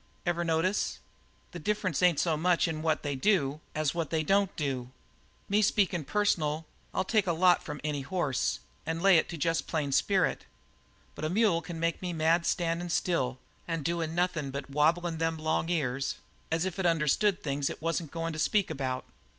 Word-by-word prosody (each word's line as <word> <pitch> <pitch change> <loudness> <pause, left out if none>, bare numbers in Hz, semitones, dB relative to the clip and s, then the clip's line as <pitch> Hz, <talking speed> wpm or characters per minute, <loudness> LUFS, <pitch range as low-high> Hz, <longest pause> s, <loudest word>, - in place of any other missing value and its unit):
Ever 175 0 0
notice? 165 +4 0 0.5
The 175 - -7
difference 185 -4 -1
ain't 180 -4 +4
so 165 -3 +2
much 175 +3 +2
in 155 -1 -3
what 160 -1 0
they 145 -2 -2
do 145 -3 +2 0.2
as 155 -2 0
what 165 -3 -2
they 160 -1 0
don't 195 +3 +2
do. 130 -5 -2 0.6
Me 205 +2 +3
speakin' 190 -6 +2
personal, 160 -6 0 0.3
I'll - - 0
take 210 0 +1
a - - +3
lot 175 +2 +4
from 150 -2 -6
any 150 -2 -1
hoss 145 -3 -1 0.2
and 160 +1 -2
lay 195 0 +6
it - - -2
to 170 - -5
jest 165 +2 0
plain 150 -4 -1
spirit; 190 +7 +2 0.7
but - - -8
a 155 - 0
mule 195 -3 +3
can 165 0 -7
make 165 0 -1
me 180 -1 -3
mad 165 +1 +3
by - - -10
standin' 170 0 0
still 145 -7 0 0.3
and 165 -3 -3
doin' 165 -1 -1
nothing 175 -5 0
but 140 +1 -6
wablin' 165 +3 +2
them 165 0 0
long 160 +1 -1
ears 135 -5 -1 0.4
as 165 +2 +1
if 185 0 -4
it 185 - +2
understood 170 +5 +2
things 140 -1 -1
it - - -6
wasn't 165 0 -2
goin' 165 +1 -3
to 155 - -5
speak 200 +2 +2
about. 130 -3 -3
165 Hz, 190 wpm, -29 LUFS, 150-180 Hz, 0.7 s, lay